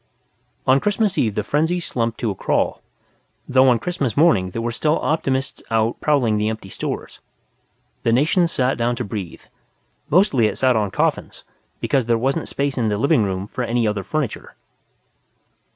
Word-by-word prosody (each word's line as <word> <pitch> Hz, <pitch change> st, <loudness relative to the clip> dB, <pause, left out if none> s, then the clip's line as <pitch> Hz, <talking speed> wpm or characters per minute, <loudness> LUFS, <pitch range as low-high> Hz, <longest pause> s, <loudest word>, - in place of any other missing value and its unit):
On 130 Hz, +1 st, +5 dB
Christmas 205 Hz, +2 st, 0 dB
Eve 110 Hz, -, 0 dB
the 105 Hz, -, -1 dB
frenzy 160 Hz, -, 0 dB
slumped 115 Hz, -8 st, -3 dB
to 115 Hz, -4 st, 0 dB
a -, -, -5 dB
crawl, -, -, 0 dB, 0.7 s
though 130 Hz, 0 st, +5 dB
on 120 Hz, -, +4 dB
Christmas 140 Hz, -, -3 dB
morning 115 Hz, -, +4 dB
there 115 Hz, +5 st, -4 dB
were 120 Hz, -, -1 dB
still 150 Hz, +6 st, +1 dB
optimists 135 Hz, -4 st, -1 dB
out 115 Hz, 0 st, 0 dB
prowling 125 Hz, -8 st, +2 dB
the 105 Hz, +1 st, +1 dB
empty 110 Hz, -3 st, -6 dB
stores. -, -, -5 dB, 0.8 s
The 115 Hz, -, +1 dB
nation 160 Hz, -, +3 dB
sat 130 Hz, -5 st, 0 dB
down 120 Hz, +1 st, +1 dB
to 120 Hz, -, -3 dB
breathe. 100 Hz, -5 st, -6 dB, 0.7 s
Mostly 145 Hz, -, +4 dB
it -, -, -4 dB
sat 130 Hz, -1 st, +3 dB
on 105 Hz, -2 st, +1 dB
coffins, -, -, -2 dB, 0.4 s
because 135 Hz, -5 st, 0 dB
there 115 Hz, -1 st, +3 dB
wasn't 135 Hz, +7 st, -1 dB
space 140 Hz, -1 st, -2 dB
in 115 Hz, -2 st, +1 dB
the 105 Hz, -, 0 dB
living 115 Hz, -1 st, +3 dB
rooms 95 Hz, 0 st, -3 dB
for 125 Hz, -, -3 dB
any 120 Hz, -1 st, 0 dB
other 105 Hz, -2 st, -1 dB
furniture. 150 Hz, +3 st, -4 dB
120 Hz, 170 wpm, -21 LUFS, 110-145 Hz, 0.8 s, On